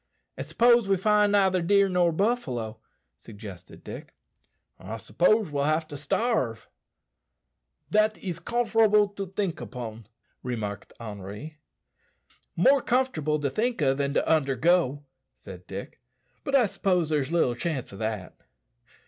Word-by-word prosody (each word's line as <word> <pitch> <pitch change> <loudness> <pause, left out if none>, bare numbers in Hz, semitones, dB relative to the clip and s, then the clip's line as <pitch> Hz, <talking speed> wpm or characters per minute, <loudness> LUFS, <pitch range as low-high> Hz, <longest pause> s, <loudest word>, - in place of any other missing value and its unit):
"And - - -6
s'pose 235 -2 +4
we 195 - +3
neither 205 -1 +3
find 170 - -4
deer 200 0 +5
nor 180 -2 +2
buffalo," 135 - -1 0.4
suggested 100 -5 -11
Dick. - - -9 0.6
"I 105 +4 -6
s'pose 190 - +2
we'll 140 -1 0
have 155 +1 +1
to 145 - -7
starve." 140 - -1 1.2
"Dat 215 +1 +3
is 175 -4 -5
cumfer'able 220 0 +3
to 195 -1 -4
tink 190 -2 -3
upon," 115 -4 -7 0.3
remarked 105 -5 -5
Henri. 105 +8 -8 1.0
"More 270 +10 +5
comfortable 235 - 0
to 140 -2 -1
think 230 - 0
o' 135 -1 +4
than 140 +1 -2
to - - +1
undergo," 145 0 +2 0.3
said 90 -3 -12
Dick; 100 +5 -8 0.4
"but 275 - 0
I 255 -3 +5
s'pose 180 -5 0
there's 150 -2 0
little 165 -8 +2
chance 130 -3 -4
o' - - -9
that." 110 -3 -4
160 Hz, 130 wpm, -27 LUFS, -, 1.2 s, deer